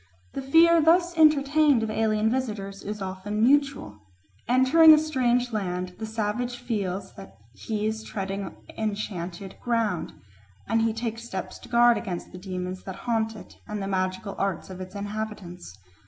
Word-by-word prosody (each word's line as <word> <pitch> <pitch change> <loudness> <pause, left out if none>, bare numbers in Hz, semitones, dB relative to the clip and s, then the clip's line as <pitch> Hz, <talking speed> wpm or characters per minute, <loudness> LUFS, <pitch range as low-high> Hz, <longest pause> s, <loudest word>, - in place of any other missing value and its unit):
The - - -4
fear 330 +5 +5
thus 345 +2 +3
entertained 300 -4 +4
of 220 - -2
alien 215 0 +1
visitors 210 -6 -3
is 210 0 -5
often 190 +3 -3
mutual. 275 - +2 0.5
Entering 285 +6 +7
a - - +2
strange 250 -6 +1
land 180 -3 -2
the 220 - -4
savage 225 +3 -2
feels 200 -6 -3
that 95 0 -13 0.2
he 215 - -3
is 220 0 -2
treading 195 -1 -4 0.2
enchanted 195 -3 -4
ground, 225 -7 -1 0.5
and 225 0 +2
he 225 0 +2
takes 225 0 -4
steps 190 -6 -6
to - - -14
guard 240 0 +5
against 180 -6 -6
the 180 - -9
demons 185 -1 -5
that 190 - -6
haunt 225 -2 0
it 215 - -13
and 210 0 -4
the 195 - -3
magical 185 +1 -2
arts 195 -1 -2
of 185 0 -8
its 185 +2 -9
inhabitants. 200 - -6
215 Hz, 155 wpm, -26 LUFS, 190-245 Hz, 0.5 s, Entering